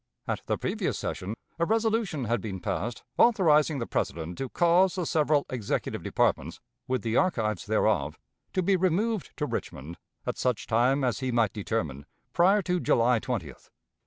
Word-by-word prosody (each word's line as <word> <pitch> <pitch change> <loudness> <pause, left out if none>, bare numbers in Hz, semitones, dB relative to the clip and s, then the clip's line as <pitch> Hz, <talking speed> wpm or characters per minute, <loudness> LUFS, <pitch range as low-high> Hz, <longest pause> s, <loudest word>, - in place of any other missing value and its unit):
At - - -2
the - - 0
previous - - -2
session, 100 +4 -4 0.2
a 170 - +3
resolution 220 - 0
had 120 +1 0
been 95 -4 -5
passed 110 +6 -3 0.2
authorizing 160 -10 +4
the 120 - -2
President 85 -3 -3
to 135 - -3
cause 175 +4 +3
the 180 -2 -2
several 150 -2 +2
executive 120 -5 -2
departments, - - 0 0.3
with 130 -1 -1
the 115 0 0
archives 110 - 0
thereof, - - +1 0.4
to 185 - +1
be 195 +2 +3
removed 190 +4 0
to 150 - -1
Richmond 85 - -5 0.3
at - - -3
such 125 -3 0
time 125 +5 +2
as 125 -3 0
he 130 -1 -2
might 115 -4 +2
determine 80 -10 -3 0.3
prior 195 +4 +4
to 180 0 0
July 120 -5 +3
20th. 100 - -5
130 Hz, 160 wpm, -28 LUFS, 110-180 Hz, 0.4 s, authorizing